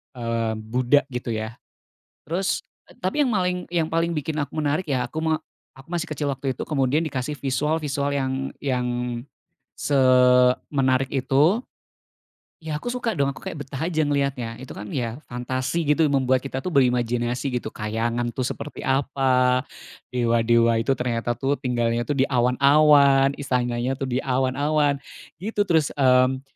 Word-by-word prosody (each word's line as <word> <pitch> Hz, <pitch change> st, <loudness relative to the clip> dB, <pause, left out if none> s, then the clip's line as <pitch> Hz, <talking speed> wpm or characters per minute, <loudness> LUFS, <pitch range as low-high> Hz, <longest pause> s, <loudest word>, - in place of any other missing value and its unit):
eee, 115 Hz, -2 st, -1 dB
Buddha 125 Hz, +6 st, +2 dB
gitu 125 Hz, -2 st, -3 dB
ya. 110 Hz, +2 st, -5 dB, 0.7 s
Terus 180 Hz, +5 st, 0 dB, 0.4 s
tapi 190 Hz, +11 st, +1 dB
yang 255 Hz, -, 0 dB
maling 180 Hz, -2 st, 0 dB
yang 165 Hz, -2 st, +1 dB
paling 165 Hz, +1 st, 0 dB
bikin 155 Hz, -1 st, -3 dB
aku 145 Hz, +3 st, -5 dB
menarik 150 Hz, +4 st, 0 dB
ya, 125 Hz, -2 st, 0 dB
aku 160 Hz, +5 st, -4 dB
me 160 Hz, -1 st, +1 dB, 0.3 s
aku 135 Hz, +2 st, -17 dB
masih 175 Hz, -1 st, -3 dB
kecil 145 Hz, -1 st, -2 dB
waktu 135 Hz, -1 st, -2 dB
itu, -, -, -6 dB
kemudian 140 Hz, -1 st, +1 dB
dikasih 140 Hz, +1 st, -4 dB
visual-visual 145 Hz, +1 st, -1 dB
yang 135 Hz, -2 st, -1 dB, 0.3 s
yang 125 Hz, -3 st, -1 dB, 0.9 s
semenarik 130 Hz, 0 st, +3 dB
itu, 140 Hz, -, +3 dB, 1.0 s
ya, 155 Hz, -1 st, -4 dB
aku 245 Hz, -, -4 dB
suka 240 Hz, -3 st, -2 dB
dong, 140 Hz, -4 st, +1 dB
aku 140 Hz, -, -9 dB
kayak 145 Hz, -2 st, -5 dB
betah 140 Hz, +3 st, -4 dB
aja 160 Hz, -3 st, 0 dB
ngeliatnya. 140 Hz, -5 st, -1 dB
Itu 130 Hz, -, -9 dB
kan 105 Hz, 0 st, -8 dB
ya 120 Hz, +2 st, -3 dB
fantasi 130 Hz, +6 st, -2 dB
gitu, 150 Hz, +3 st, +3 dB
membuat 130 Hz, -2 st, +2 dB
kita 135 Hz, -1 st, -4 dB
tuh 175 Hz, +5 st, -4 dB
berimajinasi 125 Hz, 0 st, +1 dB
gitu. 110 Hz, -, -7 dB
Kayangan 115 Hz, +3 st, -2 dB
tuh 130 Hz, -, -2 dB
seperti 150 Hz, -, -6 dB
apa, 130 Hz, -2 st, +2 dB, 0.5 s
dewa-dewa 115 Hz, -1 st, +3 dB
itu 135 Hz, -, -2 dB
ternyata 120 Hz, -1 st, -1 dB
tuh 135 Hz, +1 st, +1 dB
tinggalnya 120 Hz, -2 st, 0 dB
tuh 145 Hz, +2 st, -2 dB
di 135 Hz, -, +4 dB
awan-awan, 140 Hz, +2 st, +5 dB
istananya 125 Hz, -2 st, -1 dB
tuh 135 Hz, -1 st, -4 dB
di 125 Hz, -, 0 dB
awan-awan, 140 Hz, +3 st, +1 dB, 0.4 s
gitu. 205 Hz, +3 st, -1 dB
Terus, 160 Hz, -4 st, +2 dB
mmm, 130 Hz, -1 st, +3 dB
135 Hz, 150 wpm, -24 LUFS, 125-150 Hz, 1.0 s, awan-awan